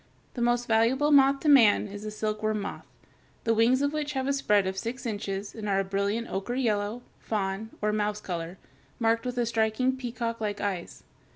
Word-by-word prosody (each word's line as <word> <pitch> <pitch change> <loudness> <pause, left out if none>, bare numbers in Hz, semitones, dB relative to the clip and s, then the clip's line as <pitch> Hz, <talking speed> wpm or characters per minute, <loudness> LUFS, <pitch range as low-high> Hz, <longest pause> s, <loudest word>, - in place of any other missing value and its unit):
The 245 - -5
most 240 0 +2
valuable 240 +7 +3
moth 275 -1 +5
to - - -2
man 235 -8 +6
is 205 0 -8
the 215 - -5
silkworm 215 0 -2
moth, - - -6 0.6
the 230 - +2
wings 240 +5 +3
of 285 +1 0
which 295 -1 -2
have 265 -1 -1
a 280 - +2
spread 210 -8 +2
of 190 0 -2
six 235 +7 -5
inches 200 -2 -4
and 215 -2 -5
are 195 -1 +2
a - - -2
brilliant 200 +4 -1
ochre 195 +6 -3
yellow, 220 -2 -1 0.2
fawn, 205 0 -3
or 210 0 +2
mouse 210 0 -1
color, 175 -2 -5 0.4
marked 230 +1 +1
with 245 -1 -1
striking 230 +3 +1
peacock 235 -2 -4
like 205 -1 -2
eyes. 190 -4 -4
220 Hz, 190 wpm, -27 LUFS, 205-245 Hz, 0.6 s, man